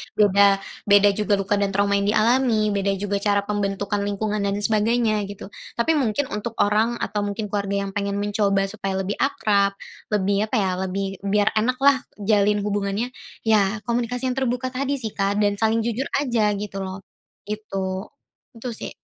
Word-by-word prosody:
beda 200 -1 +4 0.3
beda 205 0 +6
juga 210 +1 0
luka 200 +1 0
dan 200 -1 0
trauma 200 0 +2
yang 200 - -1
dialami, 220 0 +3
beda 200 0 0
juga 200 +1 -2
cara 200 0 +2
pembentukan 205 0 -2
lingkungan 210 +1 -1
dan 200 - 0
sebagainya 215 0 +2
gitu, 200 0 -9 0.2
tapi 235 +7 +2
mungkin 260 +1 0
untuk 215 +2 -4
orang 220 +3 +2
atau 210 +1 -2
mungkin 205 0 -4
keluarga 200 -1 -1
yang 195 - -5
pengen 200 0 -2
mencoba 200 -1 +1
supaya 195 -2 -4
lebih 195 +2 -3
akrab, 205 -6 +2 0.4
lebih 205 +1 +1
apa 255 - -2
ya, 195 -4 +2
lebih 190 +1 -2 0.2
biar 205 +1 +2
enak 240 +4 +2
lah 280 -1 +6 0.2
jalin 205 0 +2
hubungannya, 205 +3 -1 0.3
ya 215 -1 +2
komunikasi 245 +1 -1
yang 250 - -3
terbuka 255 0 -1
tadi 275 +2 -1
sih, 225 -6 -4
Kak, 195 +1 0
dan 205 -1 +1
saling 225 0 +2
jujur 235 +4 -2
aja 240 -6 +1
gitu 200 -1 -5
loh. 190 0 -6 0.4
Gitu, 195 -3 -3 0.6
itu 250 - -4
sih. - - -6
205 Hz, 170 wpm, -23 LUFS, 200-225 Hz, 0.6 s, beda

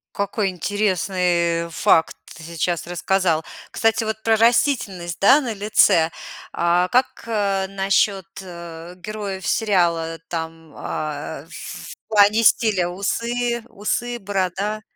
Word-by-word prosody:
Какой 200 0 -1
интересный, 180 -3 0
э, - - -10
факт 165 0 +2 0.2
ты - - -12
сейчас 170 +1 -2
рассказал. 175 -2 0 0.3
Кстати, 225 0 +1
вот 220 0 -4
про 225 0 +3
растительность, 220 - +1
да, 265 +9 +6
на 250 -5 -3
лице. 195 -5 +3 0.4
А 175 +1 +2
как, 250 +4 0
э, 200 -4 0
насчёт, 195 0 +1
э, 170 -2 -9
героев 195 -1 -6
сериала? 170 -6 +1
Там, 165 -1 -6
а, 145 -2 -5
э, - - -19
в - - -8 0.4
плане 210 +1 +4
стиля: 210 -5 +3
усы 235 +5 -2
усы, 240 +2 -3
борода? 200 +1 -2
195 Hz, 120 wpm, -21 LUFS, 170-215 Hz, 0.4 s, да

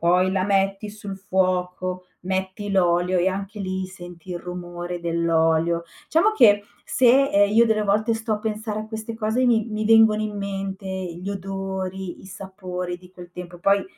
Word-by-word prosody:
Poi 180 +2 +3
la 185 -1 +1
metti 195 +1 +1
sul 205 -2 -7
fuoco, 185 -1 -1
metti 190 +2 -3
l'olio 180 -1 +2
e 180 +2 +3
anche 200 +2 -5
lì, 190 0 -2
senti 175 -1 -11
il 175 - -3
rumore 175 0 -6
dell'olio. 170 0 +1 0.3
Diciamo 335 +8 +4
che 205 - +6 0.2
se, 260 +2 +5
ehm, 205 0 +4
io 230 +2 +6
delle 220 -1 +2
volte 210 +3 +2
sto 225 0 -2
a 210 - 0
pensare 215 0 -3
a 215 - -7
queste 220 +1 -6
cose 225 +3 0
mi 230 -3 +3
mi 215 0 -2
vengono 220 -1 +6
in 210 -1 -3
mente 195 0 -4
i 185 -2 -4
gli 190 - -5
odori, 190 -1 -4
i - - -14
sapori 185 -2 -6
di 180 0 -17
quel 180 -1 -12
tempo. 175 0 -9
Poi, 200 +2 +3
190 Hz, 175 wpm, -23 LUFS, 180-210 Hz, 0.3 s, che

